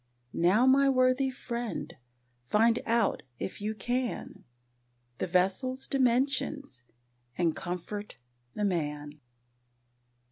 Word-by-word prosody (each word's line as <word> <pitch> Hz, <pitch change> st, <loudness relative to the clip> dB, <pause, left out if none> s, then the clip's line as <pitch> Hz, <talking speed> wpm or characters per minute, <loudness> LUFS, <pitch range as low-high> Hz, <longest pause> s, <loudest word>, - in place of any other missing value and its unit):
Now 190 Hz, +9 st, +4 dB
my 275 Hz, +1 st, +5 dB
worthy 255 Hz, 0 st, +3 dB
friend, 235 Hz, -, -5 dB, 0.5 s
find 225 Hz, -, +3 dB
out, 230 Hz, -2 st, +2 dB, 0.2 s
if 190 Hz, -, -5 dB
you 215 Hz, +1 st, -2 dB
can, 245 Hz, +3 st, -3 dB, 0.7 s
The -, -, -1 dB
vessel's 195 Hz, +9 st, +1 dB
dimensions 265 Hz, -, 0 dB, 0.5 s
and 170 Hz, -3 st, +1 dB
comfort 190 Hz, +4 st, -5 dB, 0.4 s
the 210 Hz, -, 0 dB
man! 150 Hz, -5 st, -2 dB
220 Hz, 95 wpm, -29 LUFS, 180-255 Hz, 0.7 s, my